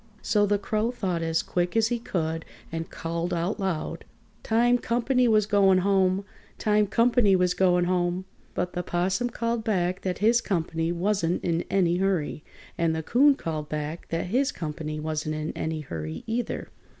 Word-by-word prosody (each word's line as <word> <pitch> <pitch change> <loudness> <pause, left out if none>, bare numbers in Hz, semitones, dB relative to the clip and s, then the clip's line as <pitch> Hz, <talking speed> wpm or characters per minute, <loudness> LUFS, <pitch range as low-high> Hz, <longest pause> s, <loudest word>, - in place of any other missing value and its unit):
So 205 -1 +3
the 205 0 +2
Crow 215 +3 -1
thought 190 -8 -2
as 165 0 0
quick 175 +3 -1
as 225 0 +3
he 240 -1 -1
could 165 -7 -2 0.3
and 165 0 -4
called 170 +1 -3
out 175 +6 -1
loud: 190 -5 -2 0.4
"Time 240 +2 +3
comp'ny 245 +2 +1
was 215 -2 +4
going 200 -2 +4
home! 190 0 +2 0.3
Time 210 -1 +2
comp'ny 230 -2 +4
was 180 -1 +2
going 180 -2 +3
home!" 180 0 0 0.3
But 180 - -2
the 180 - -1
'Possum 185 +7 0
called 230 -1 -2
back 185 -4 0
that 185 -1 -2
his 230 +3 +3
comp'ny 165 -4 -1
wasn't 175 -1 0
in 170 -1 0
any 175 -3 +2
hurry. 180 -5 -1 0.4
And 165 -1 +2
the 160 - -3
Coon 275 - +5
called 155 - -4
back 150 +2 -4
that 165 - -1
his 270 +2 +2
comp'ny 155 - -5
wasn't 155 0 -2
in 155 +1 -3
any 160 -1 -3
hurry 80 - -6
either. 235 +2 -3
185 Hz, 170 wpm, -26 LUFS, 165-215 Hz, 0.4 s, Coon